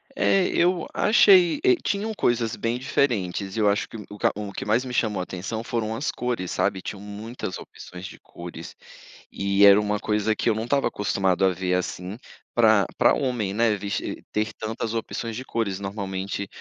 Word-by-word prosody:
É, 195 Hz, -8 st, +3 dB
eu 175 Hz, -1 st, +1 dB
achei. 195 Hz, -, +5 dB
Eh, 375 Hz, -1 st, +5 dB
tinham 210 Hz, +2 st, -1 dB
coisas 120 Hz, -, 0 dB
bem 115 Hz, +2 st, -2 dB
diferentes, 100 Hz, -8 st, -1 dB
e 115 Hz, -, -2 dB
eu 105 Hz, -1 st, +4 dB
acho 100 Hz, -, 0 dB
que -, -, -8 dB
o 105 Hz, -1 st, -10 dB
q -, -, +3 dB
o 105 Hz, -1 st, -5 dB
que -, -, -5 dB
mais 110 Hz, +5 st, +2 dB
me 125 Hz, -, -6 dB
chamou 105 Hz, -5 st, 0 dB
atenção 95 Hz, +5 st, -5 dB
foram 115 Hz, -2 st, -2 dB
as 135 Hz, +6 st, -2 dB
cores, 120 Hz, -7 st, -3 dB
sabe. 95 Hz, -, 0 dB
Tinham 100 Hz, -, -6 dB
muitas 105 Hz, 0 st, -6 dB
opções 90 Hz, +1 st, -10 dB
de -, -, -10 dB
cores, 85 Hz, -1 st, -10 dB, 0.6 s
e 100 Hz, +1 st, +3 dB
era 100 Hz, 0 st, +8 dB
uma 105 Hz, 0 st, -1 dB
coisa 105 Hz, 0 st, 0 dB
que -, -, 0 dB
eu 110 Hz, -, +2 dB
não 110 Hz, -, -2 dB
estava 140 Hz, +3 st, +1 dB
acostumado 95 Hz, -2 st, 0 dB
a -, -, +5 dB
ver 90 Hz, 0 st, -2 dB
assim 90 Hz, +2 st, -4 dB, 0.4 s
para 110 Hz, -4 st, +5 dB
para -, -, +5 dB
homem, 120 Hz, -7 st, -1 dB
né, 115 Hz, 0 st, +2 dB
ves 100 Hz, 0 st, -2 dB, 0.3 s
ter 110 Hz, +1 st, -1 dB
tantas 110 Hz, 0 st, -4 dB
opções 115 Hz, 0 st, -4 dB
de 125 Hz, -, -5 dB
cores. 105 Hz, -6 st, -2 dB
Normalmente, 100 Hz, 0 st, -4 dB
105 Hz, 190 wpm, -24 LUFS, 100-120 Hz, 0.6 s, era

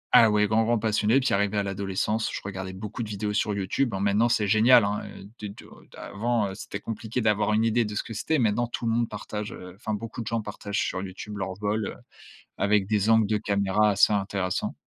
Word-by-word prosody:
ah 115 Hz, -, +8 dB
ouais, 105 Hz, 0 st, +3 dB
grand 110 Hz, +2 st, +3 dB
grand 120 Hz, +1 st, +2 dB
passionné. 110 Hz, +3 st, +2 dB
Puis 135 Hz, -, 0 dB
arrivé 100 Hz, +1 st, 0 dB
à -, -, 0 dB
l'adolescence, 100 Hz, +3 st, -1 dB
je -, -, -3 dB
regardais 95 Hz, -1 st, -5 dB
beaucoup 105 Hz, +4 st, -6 dB
de 110 Hz, -, -7 dB
vidéos 105 Hz, 0 st, -3 dB
sur 105 Hz, +1 st, 0 dB
YouTube. 100 Hz, +7 st, 0 dB
Bon 95 Hz, -2 st, -3 dB
maintenant, 100 Hz, +4 st, +2 dB
c'est 105 Hz, -3 st, +1 dB
génial 110 Hz, +3 st, +6 dB
hein, 100 Hz, +1 st, -1 dB
heu, -, -, -11 dB
des 105 Hz, -2 st, -5 dB
du 100 Hz, -, -12 dB
heu -, -, -16 dB, 0.3 s
avant, 115 Hz, +1 st, -1 dB
heu, 95 Hz, -, -7 dB
c'était 105 Hz, -, -6 dB
compliqué 115 Hz, +3 st, -4 dB
d'avoir 105 Hz, 0 st, +2 dB
une 110 Hz, +1 st, +3 dB
idée 115 Hz, 0 st, +2 dB
de 105 Hz, -, -5 dB
ce 105 Hz, -, -1 dB
que 115 Hz, -, -8 dB
c'était. 155 Hz, +8 st, 0 dB
Maintenant 115 Hz, 0 st, +2 dB
tout 120 Hz, 0 st, -4 dB
le 115 Hz, -, +2 dB
monde 115 Hz, 0 st, +1 dB
partage 105 Hz, +1 st, -5 dB
heu 90 Hz, -1 st, -10 dB
enfin 110 Hz, +1 st, -4 dB
beaucoup 115 Hz, +3 st, -5 dB
de -, -, -11 dB
gens 115 Hz, -1 st, -1 dB
partagent 105 Hz, 0 st, -4 dB
sur 95 Hz, -, -2 dB
YouTube 100 Hz, +2 st, -7 dB
leur 95 Hz, -1 st, -3 dB
vol, 105 Hz, +2 st, -2 dB
heu, -, -, -5 dB, 0.6 s
avec 100 Hz, -1 st, +2 dB
des 105 Hz, 0 st, +2 dB
angles 110 Hz, -2 st, +4 dB
de 110 Hz, -, +2 dB
caméra 100 Hz, 0 st, +2 dB
assez 100 Hz, +1 st, +4 dB
intéressants. 95 Hz, -2 st, -1 dB
105 Hz, 240 wpm, -26 LUFS, 100-110 Hz, 0.6 s, ah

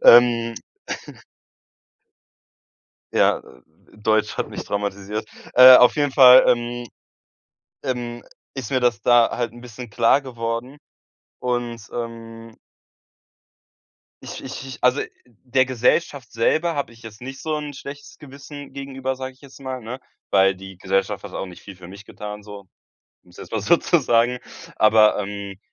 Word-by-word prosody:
ähm 115 Hz, -1 st, +6 dB, 2.6 s
Ja, -, -, +3 dB
äh, 60 Hz, -, -18 dB, 0.4 s
Deutsch 110 Hz, 0 st, 0 dB
hat -, -, -2 dB
mich -, -, -6 dB
traumatisiert. 100 Hz, +1 st, -4 dB, 0.3 s
Äh, 130 Hz, 0 st, +10 dB
auf 125 Hz, -1 st, +6 dB
jeden 145 Hz, -2 st, +1 dB
Fall, 130 Hz, -1 st, +9 dB
ähm 120 Hz, 0 st, 0 dB, 1.0 s
ähm, 120 Hz, -3 st, -4 dB, 0.3 s
ist 130 Hz, -5 st, -6 dB
mir 130 Hz, -2 st, +1 dB
das 120 Hz, -4 st, +1 dB
da 120 Hz, -1 st, +5 dB
halt 120 Hz, -3 st, -2 dB
'n 120 Hz, -, -13 dB
bisschen 120 Hz, -1 st, -10 dB
klar 115 Hz, +5 st, +3 dB
geworden. 120 Hz, +1 st, -5 dB, 0.6 s
Und, 120 Hz, -3 st, -3 dB
ähm 115 Hz, -1 st, -8 dB, 1.7 s
ich -, -, -8 dB
ich 135 Hz, 0 st, -7 dB
ich 130 Hz, -, -8 dB
also 125 Hz, +2 st, +3 dB, 0.2 s
der 125 Hz, +2 st, -1 dB
Gesellschaft 130 Hz, +1 st, 0 dB
selber 160 Hz, +9 st, +1 dB
habe 140 Hz, -4 st, -3 dB
ich 115 Hz, -, -19 dB
jetzt 110 Hz, -1 st, -12 dB
nicht 135 Hz, +2 st, -8 dB
so 155 Hz, -1 st, -2 dB
'n 150 Hz, -1 st, -5 dB
schlechtes 140 Hz, +1 st, -10 dB
Gewissen 145 Hz, 0 st, -11 dB
gegenüber, 135 Hz, -1 st, -5 dB
sage 130 Hz, 0 st, -6 dB
ich 130 Hz, -, -28 dB
jetzt 140 Hz, -1 st, -15 dB
mal, 130 Hz, -2 st, -6 dB
ne? 120 Hz, +4 st, -7 dB, 0.3 s
Weil 95 Hz, 0 st, +4 dB
die 95 Hz, 0 st, -12 dB
Gesellschaft 95 Hz, +1 st, -1 dB
hat -, -, -9 dB
auch 95 Hz, -, -4 dB
nicht 90 Hz, -, -13 dB
viel 100 Hz, -, -11 dB
für 90 Hz, -1 st, -13 dB
mich 100 Hz, +2 st, -12 dB
getan 105 Hz, 0 st, -8 dB
so, 100 Hz, -2 st, -11 dB, 0.6 s
um's 90 Hz, -, -20 dB
jetzt -, -, -10 dB
mal 110 Hz, -, -2 dB
so 105 Hz, -, +4 dB
zu 170 Hz, -, +2 dB
sagen. 120 Hz, -2 st, +2 dB, 0.4 s
Aber, 110 Hz, 0 st, +5 dB
ähm, 100 Hz, -1 st, -6 dB
120 Hz, 150 wpm, -22 LUFS, 110-130 Hz, 2.6 s, Äh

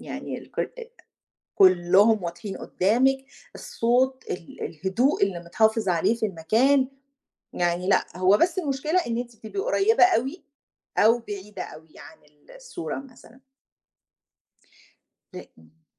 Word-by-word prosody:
يعني -, -, -6 dB
ال -, -, -16 dB
كل -, -, -2 dB
آآ 470 Hz, 0 st, -9 dB, 0.7 s
كُلّهم 190 Hz, +3 st, +4 dB
واضحين 175 Hz, +4 st, -6 dB
قُدّامك، 250 Hz, +8 st, +1 dB, 0.4 s
الصوت، 260 Hz, +3 st, 0 dB
ال 170 Hz, -, -7 dB
الهدوء 195 Hz, -, 0 dB
اللي 195 Hz, -3 st, -1 dB
متحافظ 220 Hz, +4 st, +1 dB
عليه 175 Hz, +6 st, +2 dB
في 225 Hz, -, -2 dB
المكان، 235 Hz, -, +2 dB, 0.7 s
يعني 175 Hz, +1 st, -1 dB
لأ، -, -, +3 dB
هو 185 Hz, +2 st, +4 dB
بس 360 Hz, +1 st, +1 dB
المشكلة 300 Hz, +2 st, 0 dB
إن 230 Hz, 0 st, -2 dB
أنتِ 240 Hz, -2 st, -6 dB
بتبقي 220 Hz, -, -6 dB
قريّبة 450 Hz, -1 st, +3 dB
أوي 330 Hz, -2 st, 0 dB, 0.5 s
أو 230 Hz, +3 st, +5 dB
بعيدة 205 Hz, -3 st, -8 dB
أوي 155 Hz, 0 st, -12 dB
عن -, -, -13 dB, 0.4 s
الصورة -, -, -6 dB
مثلًا. 255 Hz, -1 st, -17 dB, 1.9 s
ل -, -, -8 dB, 0.2 s
إمم. 80 Hz, 0 st, -24 dB
225 Hz, 125 wpm, -25 LUFS, 185-270 Hz, 1.9 s, أو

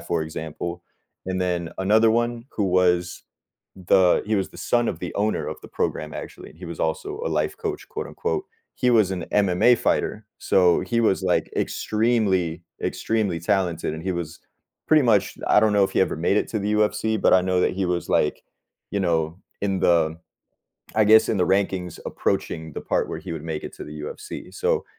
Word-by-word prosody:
for 85 Hz, -2 st, -1 dB
example, 80 Hz, +2 st, -6 dB, 0.4 s
and 95 Hz, 0 st, -2 dB
then 90 Hz, -2 st, -1 dB
another 110 Hz, +4 st, +4 dB
one, 120 Hz, 0 st, 0 dB
who 105 Hz, -, -1 dB
was 90 Hz, -1 st, +1 dB, 0.5 s
the 90 Hz, 0 st, +3 dB
he 110 Hz, -, +1 dB
was 95 Hz, -, -1 dB
the -, -, -14 dB
son 120 Hz, -1 st, +1 dB
of 80 Hz, -, -3 dB
the 90 Hz, -, -6 dB
owner 105 Hz, +2 st, 0 dB
of -, -, -6 dB
the -, -, -12 dB
program, 75 Hz, -1 st, -3 dB
actually. -, -, -8 dB
He 85 Hz, +3 st, -12 dB
was 85 Hz, -1 st, -7 dB
also 395 Hz, -, -2 dB
a -, -, 0 dB
"life -, -, -1 dB
coach", 410 Hz, -3 st, -5 dB
quote -, -, -5 dB
unquote. 445 Hz, -4 st, -3 dB, 0.3 s
He 125 Hz, -1 st, +2 dB
was 110 Hz, -5 st, +4 dB
an 90 Hz, -, -3 dB
MMA 105 Hz, +4 st, +4 dB
fighter. -, -, -1 dB
So, 90 Hz, -2 st, +3 dB
he 115 Hz, -1 st, 0 dB
was, 100 Hz, -4 st, +2 dB
like, 90 Hz, -1 st, +1 dB
extremely, 100 Hz, -7 st, 0 dB, 0.2 s
extremely 105 Hz, -6 st, -1 dB
talented, 85 Hz, -4 st, 0 dB
and 80 Hz, -, -7 dB
he 95 Hz, 0 st, -1 dB
was 85 Hz, -1 st, -5 dB, 0.5 s
pretty 155 Hz, -2 st, +6 dB
much 110 Hz, -5 st, +2 dB
I 105 Hz, -, +5 dB
don't 110 Hz, -1 st, +3 dB
know 100 Hz, -1 st, +5 dB
if -, -, -2 dB
he -, -, +2 dB
ever 95 Hz, -, +1 dB
made 85 Hz, +5 st, +1 dB
it -, -, -1 dB
to 110 Hz, -, -2 dB
the 105 Hz, +1 st, -1 dB
UFC, 105 Hz, 0 st, +1 dB
but -, -, +4 dB
I 95 Hz, -, +6 dB
know 90 Hz, -1 st, +1 dB
that -, -, +2 dB
he 95 Hz, 0 st, -1 dB
was, 90 Hz, -1 st, -2 dB
like, 75 Hz, -, +1 dB, 0.5 s
you 100 Hz, -, -1 dB
know, 85 Hz, -2 st, 0 dB, 0.2 s
in 95 Hz, -2 st, 0 dB
the 80 Hz, -2 st, +3 dB, 0.8 s
I 110 Hz, -, +5 dB
guess, 110 Hz, +1 st, +6 dB
in 110 Hz, -, +1 dB
the 90 Hz, -, +2 dB
rankings 95 Hz, -2 st, 0 dB
approaching 80 Hz, -1 st, -2 dB
the -, -, -4 dB
part -, -, -1 dB
where -, -, -4 dB
he 90 Hz, -3 st, -6 dB
would 80 Hz, -1 st, -6 dB
make 80 Hz, -2 st, -4 dB
it -, -, -8 dB
to -, -, -8 dB
the 75 Hz, 0 st, -9 dB
UFC. 75 Hz, -, -8 dB
So -, -, 0 dB
95 Hz, 200 wpm, -24 LUFS, 85-110 Hz, 0.8 s, pretty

